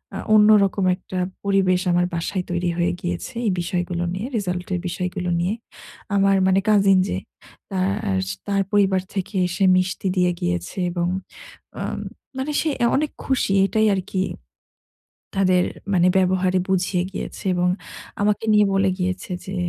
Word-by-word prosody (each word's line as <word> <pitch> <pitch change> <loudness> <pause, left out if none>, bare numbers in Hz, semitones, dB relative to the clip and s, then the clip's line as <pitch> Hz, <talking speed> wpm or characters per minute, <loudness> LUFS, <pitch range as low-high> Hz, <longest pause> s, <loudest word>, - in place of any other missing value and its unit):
আ - - -3 0.2
অন্যরকম 210 -2 +5
একটা 185 0 -8 0.3
পরিবেশ 190 -2 +2
আমার 175 0 +3
বাসায় 180 +2 -2
তৈরি 175 0 0
হয়ে 175 0 +1
গিয়েছে। 175 +8 -4
এই - - +3
বিষয়গুলো 175 0 -2
নিয়ে। 195 +6 -4
রেজাল্ট 180 -3 -3
এর 180 - 0
বিষয়গুলো 180 +1 -3
নিয়ে। 180 +5 0 0.6
আমার 195 0 +4
মানে 190 +1 +4
কাজিন 200 -2 +5
যে 90 - -1 0.5
তার 95 0 0 0.3
তার 200 -1 +1
পরিবার 195 -2 +3
থেকে 195 +2 -3
এসে 180 +3 -2
মিষ্টি 185 +1 0
দিয়ে 180 -1 +3
গিয়েছে 85 - -2
এবং 175 0 -1 0.7
আ - - -4 0.6
মানে 270 +3 -2
সে 320 - 0
অ্যা 235 - +3
অনেক 300 +1 -1
খুশি। 265 -7 +1
এটাই 215 +3 +2
আরকি 185 0 -2 1.1
তাদের 185 -2 +3 0.3
মানে 180 -1 +4
ব্যবহারে 185 0 +2
বুঝিয়ে 185 -1 +1
গিয়েছে - - -6
এবং 180 0 +2 0.5
আমাকে 210 +1 +1
নিয়ে 210 -1 +5
বলে 195 0 +3
গিয়েছে 185 0 -2
যে 190 - -5
185 Hz, 145 wpm, -22 LUFS, 180-195 Hz, 1.1 s, অন্যরকম